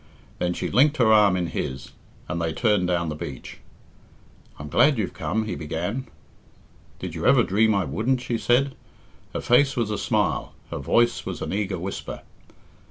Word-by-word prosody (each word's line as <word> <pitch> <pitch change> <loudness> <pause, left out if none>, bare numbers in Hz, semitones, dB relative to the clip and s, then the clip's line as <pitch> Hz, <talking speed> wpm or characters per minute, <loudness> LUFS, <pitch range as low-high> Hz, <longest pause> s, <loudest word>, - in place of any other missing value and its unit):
Then 90 0 0
she - - -3
linked 145 +4 +4
her 110 -3 +5
arm 105 -3 +5
in 90 - -1
his, 65 -4 -5 0.4
and 85 +1 -3
they 80 -1 -1
turned 105 -6 +2
down 85 -2 0
the 75 - -4
beach. 70 -4 -8 1.0
"I'm 70 - -7
glad 140 - +4
you've 105 -4 -2
come," 110 +3 -2
he 110 - -3
began. 90 - -4 0.9
"Did - - -6
you - - -1
ever - - +6
dream 110 +2 +2
I 100 - +1
wouldn't?" 125 +4 0
she 120 -2 -3
said. 135 +3 +2 0.6
Her - - -1
face 135 +3 +3
was 115 -3 -1
a 105 - -2
smile, - - 0 0.2
her - - -3
voice 120 0 +2
was - - -5
an - - -4
eager 100 -2 -1
whisper. 95 +3 -6
105 Hz, 175 wpm, -24 LUFS, 90-120 Hz, 1.0 s, ever